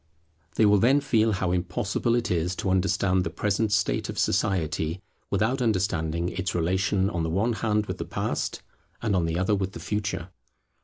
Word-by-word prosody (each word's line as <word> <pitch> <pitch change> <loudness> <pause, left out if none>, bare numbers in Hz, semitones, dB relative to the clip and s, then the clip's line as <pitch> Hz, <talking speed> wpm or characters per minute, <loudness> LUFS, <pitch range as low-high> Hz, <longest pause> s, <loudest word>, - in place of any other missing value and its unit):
They 110 - +4
will 105 -1 +5
then 130 +7 +4
feel 115 -5 +2
how 90 -2 -1
impossible 95 +6 0
it 120 -5 -1
is 90 +1 0
to 95 - -1
understand 95 0 +2
the 85 - -2
present 105 +4 0
state 105 +1 +1
of - - -5
society, 80 -2 0 0.3
without 110 +7 +1
understanding 85 -6 0
its 95 0 -3
relation 95 +3 +1
on 90 -5 -2
the 80 - -1
one 105 +8 +1
hand 105 -1 0
with - - -5
the - - -3
Past, - - -3 0.4
and 105 -4 +1
on 90 -2 +2
the 80 +1 -1
other 95 +3 +1
with 95 -1 -1
the - - -7
Future. 100 -4 -3
95 Hz, 185 wpm, -26 LUFS, 90-105 Hz, 0.4 s, will